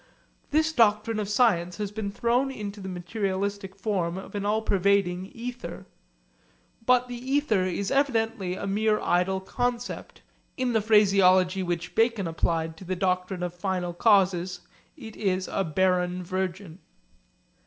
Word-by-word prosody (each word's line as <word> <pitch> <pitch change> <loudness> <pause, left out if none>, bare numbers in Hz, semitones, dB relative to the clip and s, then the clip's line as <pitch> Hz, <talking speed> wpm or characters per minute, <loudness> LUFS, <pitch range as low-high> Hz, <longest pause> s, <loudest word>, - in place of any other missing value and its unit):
This 315 +2 +2
doctrine 220 -2 +3
of 205 -2 -3
science 200 -6 +2
has 205 -2 -3
been 210 -1 -4
thrown 235 +5 +1
into 210 -5 -6
the 190 - -6
materialistic 195 +1 -3
form 190 -4 -1
of 190 - -9
an 205 0 -2
all 220 +1 +1
pervading 190 -2 +1
ether. 230 -6 -7 1.0
But 250 0 +4
the 245 - -7
ether 260 -7 +1
is 190 +1 -2
evidently 225 -8 0
a - - -5
mere 215 +2 +1
idle 180 +2 +1
concept 245 +5 -4 0.3
in 255 -2 0
the 220 - +3
phraseology 195 -3 +4
which 175 -1 -3
Bacon 225 -3 +2
applied 165 -1 -1
to 190 - -11
the 185 +1 -3
doctrine 180 0 -1
of 175 -1 -3
final 180 -1 -2
causes, 185 -3 +2 0.4
it 225 -6 -10
is 185 -2 -1
a 195 - -1
barren 180 +1 +1
virgin. 185 -1 -4
195 Hz, 145 wpm, -26 LUFS, 180-220 Hz, 1.0 s, But